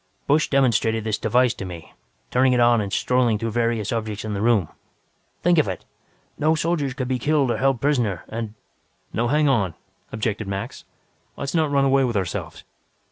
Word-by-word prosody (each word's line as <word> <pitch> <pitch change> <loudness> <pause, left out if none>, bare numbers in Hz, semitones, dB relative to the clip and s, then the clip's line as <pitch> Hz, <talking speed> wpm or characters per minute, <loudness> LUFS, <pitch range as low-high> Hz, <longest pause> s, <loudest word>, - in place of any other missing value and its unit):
"Busch 150 +2 +3
demonstrated 115 -5 +2
this 110 -1 -1
device 125 +2 +2
to - - -7
me, 85 -3 -9 0.4
turning 130 0 +3
it 125 - +2
on 120 -1 +4
and 100 -1 -4
strolling 125 0 +2
through 115 +1 -3
various 115 -2 0
objects 110 -2 -3
in 105 - -3
this 100 - -2
room. 110 -7 +3 0.8
Think 175 -1 +4
of 155 - +2
it! 95 - -5 0.5
No 155 +2 +3
soldier 155 -3 0
could 130 -3 -3
be 130 -1 -1
killed 145 -1 +2
or - - -1
held 135 -2 +1
prisoner. 120 - 0
And 110 -1 -5 0.3
" - - -42
"Now 120 +3 0
hang 150 +3 +2
on," 100 - +1 0.4
objected 110 -1 -2
Max. 100 0 -5 0.5
"Let's 140 0 -4
not 160 -3 +2
run 140 -1 +2
away 135 0 +3
with 120 -4 0
ourselves. 95 -3 -4
120 Hz, 190 wpm, -23 LUFS, 110-135 Hz, 0.8 s, on